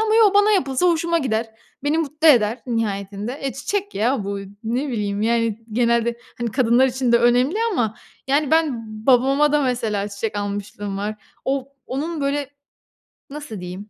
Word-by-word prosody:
ama 440 Hz, 0 st, +2 dB
yo, 435 Hz, -3 st, +5 dB
bana 410 Hz, +1 st, +5 dB
yapılsa 275 Hz, -5 st, +2 dB
hoşuma 335 Hz, 0 st, +2 dB
gider. 225 Hz, -5 st, -1 dB, 0.3 s
Beni 300 Hz, +3 st, +1 dB
mutlu 310 Hz, +1 st, +2 dB
eder 230 Hz, -4 st, +4 dB
nihayetinde. 210 Hz, +1 st, -3 dB
Eee, 270 Hz, -, -2 dB
çiçek 405 Hz, -, -3 dB
ya 230 Hz, 0 st, 0 dB
bu 200 Hz, 0 st, -3 dB
y 195 Hz, -, -9 dB, 0.2 s
ne 245 Hz, +6 st, -1 dB
bileyim, 210 Hz, -4 st, -2 dB
yani, 230 Hz, -1 st, 0 dB
genelde, 235 Hz, 0 st, +2 dB, 0.2 s
hani, 240 Hz, -1 st, -2 dB
kadınlar 250 Hz, +1 st, +4 dB
için 255 Hz, -1 st, 0 dB
de 235 Hz, -, +6 dB
önemli 245 Hz, -, +3 dB, 0.2 s
ama, 225 Hz, -, 0 dB, 0.3 s
yani, 285 Hz, +1 st, +2 dB
ben 315 Hz, -5 st, +3 dB, 0.3 s
babama 275 Hz, +3 st, +4 dB
da 295 Hz, -1 st, +3 dB
mesela 225 Hz, -6 st, -1 dB
çiçek 205 Hz, +1 st, -4 dB
almışlığım 205 Hz, 0 st, -4 dB
var. 210 Hz, +1 st, -3 dB, 0.3 s
O 270 Hz, 0 st, -1 dB, 0.2 s
onun 310 Hz, +4 st, -3 dB
böyle 280 Hz, 0 st, -1 dB, 0.8 s
nasıl 290 Hz, -7 st, -7 dB
diyeyim? 185 Hz, +4 st, -8 dB
245 Hz, 165 wpm, -21 LUFS, 215-290 Hz, 0.8 s, de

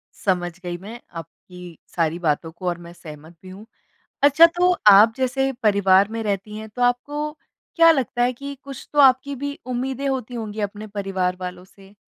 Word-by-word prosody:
समझ 180 Hz, -3 st, -1 dB
गई 175 Hz, -1 st, -4 dB
मैं 215 Hz, +7 st, -10 dB, 0.2 s
आपकी 175 Hz, +1 st, -12 dB, 0.2 s
सारी 165 Hz, 0 st, 0 dB
बातों 160 Hz, -1 st, -1 dB
को 180 Hz, +2 st, -8 dB
और 175 Hz, -1 st, -1 dB
मैं 170 Hz, -, -11 dB
सहमत 160 Hz, 0 st, -13 dB
भी 185 Hz, -, -11 dB
हूँ। 195 Hz, +3 st, -11 dB, 0.6 s
अच्छा, 290 Hz, +4 st, +7 dB
तो 355 Hz, +2 st, +1 dB, 0.2 s
आप 210 Hz, +3 st, +7 dB
जैसे 265 Hz, +1 st, 0 dB
परिवार 200 Hz, -1 st, +4 dB
में 225 Hz, 0 st, -4 dB
रहती 205 Hz, 0 st, -3 dB
हैं 220 Hz, -, -8 dB
तो 245 Hz, +3 st, -5 dB
आपको 290 Hz, +5 st, -1 dB, 0.4 s
क्या 330 Hz, -1 st, +7 dB
लगता 255 Hz, -5 st, 0 dB
है 245 Hz, -, +2 dB
कि 280 Hz, +3 st, -8 dB
कुछ 275 Hz, -2 st, -10 dB
तो 295 Hz, -, -3 dB
आपकी 270 Hz, +1 st, +4 dB
भी 285 Hz, +2 st, -5 dB
उम्मीदें 260 Hz, +2 st, -3 dB
होती 255 Hz, -2 st, -3 dB
होंगी 215 Hz, -2 st, -5 dB
अपने 205 Hz, +1 st, -5 dB
परिवार 195 Hz, -3 st, -2 dB
वालों 180 Hz, 0 st, -7 dB
से? 195 Hz, +1 st, -19 dB
210 Hz, 185 wpm, -22 LUFS, 185-265 Hz, 0.6 s, अच्छा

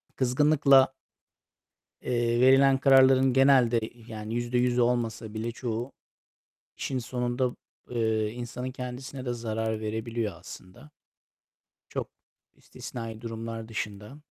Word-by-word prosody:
Kızgınlıkla 135 Hz, +1 st, +4 dB, 1.1 s
eee, 120 Hz, -1 st, 0 dB
verilen 135 Hz, +1 st, +6 dB
kararların 135 Hz, -1 st, +5 dB
genelde, 130 Hz, -3 st, +5 dB, 0.3 s
yani, 110 Hz, 0 st, -6 dB
%100'ü 120 Hz, +1 st, +1 dB
olmasa 115 Hz, -3 st, -1 dB
bile 110 Hz, +2 st, -3 dB
çoğu, 120 Hz, +1 st, -4 dB, 0.9 s
işin 130 Hz, -, -2 dB
sonunda, 125 Hz, +1 st, -2 dB, 0.3 s
eee, 110 Hz, -3 st, 0 dB
insanın 125 Hz, +2 st, -6 dB
kendisine 130 Hz, +1 st, -7 dB
de 120 Hz, -, -1 dB
zarar 110 Hz, -1 st, -3 dB
verebiliyor 110 Hz, 0 st, -3 dB
aslında. 90 Hz, +9 st, -13 dB, 1.0 s
Çok -, -, -4 dB, 0.5 s
istisnai 115 Hz, -2 st, -8 dB
durumlar 115 Hz, -1 st, -6 dB
dışında. 105 Hz, +3 st, -6 dB
120 Hz, 95 wpm, -27 LUFS, 115-130 Hz, 1.1 s, verilen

